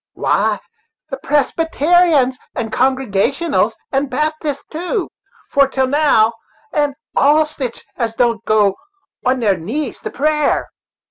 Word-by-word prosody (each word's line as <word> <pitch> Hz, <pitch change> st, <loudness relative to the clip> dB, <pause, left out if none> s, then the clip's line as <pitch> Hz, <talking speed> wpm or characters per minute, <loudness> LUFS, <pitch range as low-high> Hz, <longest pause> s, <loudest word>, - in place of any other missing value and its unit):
"Why, -, -, +1 dB, 0.5 s
the 270 Hz, -, -3 dB
Presbyter'ans 295 Hz, 0 st, +2 dB, 0.2 s
and 225 Hz, -3 st, -3 dB
Congregationals, 265 Hz, -, +1 dB, 0.2 s
and 270 Hz, 0 st, 0 dB
Baptists, 305 Hz, -1 st, -2 dB
too, 355 Hz, +4 st, -2 dB, 0.4 s
for 280 Hz, -1 st, +4 dB
til' 265 Hz, -1 st, 0 dB
now; 260 Hz, -5 st, +3 dB, 0.4 s
and 290 Hz, -2 st, +1 dB, 0.2 s
all 300 Hz, +2 st, +4 dB
sitch 265 Hz, -6 st, -6 dB
as 230 Hz, -2 st, -2 dB
don't 230 Hz, -2 st, +1 dB
go 210 Hz, -2 st, +3 dB, 0.5 s
on 255 Hz, 0 st, +1 dB
their 200 Hz, -4 st, +2 dB
knees 245 Hz, -, -4 dB
to -, -, -5 dB
prayer." 300 Hz, +1 st, 0 dB
275 Hz, 120 wpm, -18 LUFS, 240-305 Hz, 0.5 s, for